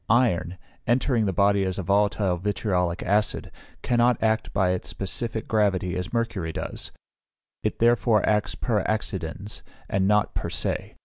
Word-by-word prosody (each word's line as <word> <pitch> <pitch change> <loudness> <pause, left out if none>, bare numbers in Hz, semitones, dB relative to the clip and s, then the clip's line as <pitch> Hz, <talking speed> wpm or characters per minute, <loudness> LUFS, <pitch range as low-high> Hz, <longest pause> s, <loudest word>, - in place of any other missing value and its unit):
Iron, 95 -7 +2 0.3
entering 120 -2 +2
the - - +1
body 100 +1 +3
as 95 -1 -2
a 95 - -2
volatile 100 0 +2
vitriolic 90 -2 -1
acid, 105 +3 0 0.3
cannot 120 0 +3
act 110 0 +1
by 95 -2 +2
its 90 - -3
specific 110 +4 -3
gravity 95 -4 +1
as 90 +3 -4
mercury 115 -8 -1
does; - - -5 0.7
it - - -1
therefore 115 -2 +3
acts 105 -1 +1
per 110 -4 0
accidens, 100 -2 -3 0.3
and 95 -1 +1
not 105 0 +2
per - - -3
se. - - -2
105 Hz, 145 wpm, -25 LUFS, 95-110 Hz, 0.7 s, body